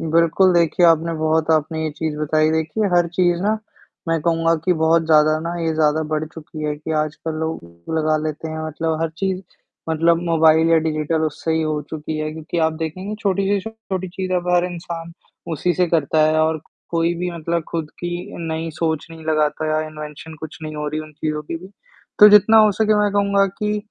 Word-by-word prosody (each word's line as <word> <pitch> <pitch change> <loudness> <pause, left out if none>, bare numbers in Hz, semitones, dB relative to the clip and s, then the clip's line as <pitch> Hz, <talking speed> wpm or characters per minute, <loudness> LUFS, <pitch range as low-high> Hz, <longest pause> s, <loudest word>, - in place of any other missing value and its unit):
बिल्कुल, 170 +3 +3
देखिए 170 +1 +3
आपने 165 0 +3
बहुत 155 0 +1
आपने 160 0 +1
ये 155 - -1
चीज़ 155 -2 -3
बताई, 155 +1 +2
देखिए 160 +7 -1
हर 175 -1 +4
चीज़ 175 0 +1
ना 215 +2 +1 0.5
मैं 165 -1 +1
कहूँगा 165 0 +2
कि 185 - +3
बहुत 165 0 +2
ज़्यादा 155 -1 +4
ना 170 +1 -4
ये 165 -1 0
ज़्यादा 155 0 +2
बढ़ 155 0 0
चुकी 155 -1 -9
है 150 0 -1
कि 155 +2 -5
आजकल 155 +1 -5
लोग 85 - -5
लगा 155 0 +2
लेते 155 +1 -4
हैं, 160 0 -5
मतलब 160 +1 -2
हर 165 -1 0
चीज़ 190 0 -1 0.5
मतलब 165 +1 +3
मोबाइल 160 -1 +4
या 165 - +6
डिजिटल 155 0 -1
उससे 160 +1 -2
ही 160 0 +1
हो 155 -1 -1
चुकी 155 0 -4
है 155 0 -2
क्योंकि 160 +2 -5
आप 160 - +1
देखेंगे 165 +6 -5
छोटी 195 -1 0
से 200 0 +2
छोटी 190 -4 -5
चीज़ 185 +1 -4
अब 180 -1 -1
हर 175 0 +3
इंसान 170 -1 -6 0.4
उसी 170 +3 0
से 180 +3 +2
करता 155 -2 +1
है 155 0 +2
और 160 0 +1 0.3
कोई 170 0 +1
भी 180 0 -2
मतलब 170 0 -2
खुद 160 -3 -4
की 175 - -4 0.4
नई 160 +1 -3
सोच 160 -1 -2
नहीं 160 -1 -11
लगाता 155 0 0
है 155 - -1
या 155 0 +1
इन्वेंशन 155 +1 -9
कुछ 160 -1 -8
नहीं 155 0 -6
हो 150 0 -3
रही 155 +1 -3
है - - -7
उन 155 - -16
चीज़ों 150 0 -3
की 150 - -5
भी, 180 +3 -11 0.5
तो 210 - +10
जितना 210 +2 +6
हो 215 -1 +6
सके 215 +1 +2
मैं 205 0 +2
कहूँगा 200 -1 +3
कि 210 0 0
160 Hz, 210 wpm, -20 LUFS, 155-175 Hz, 0.5 s, तो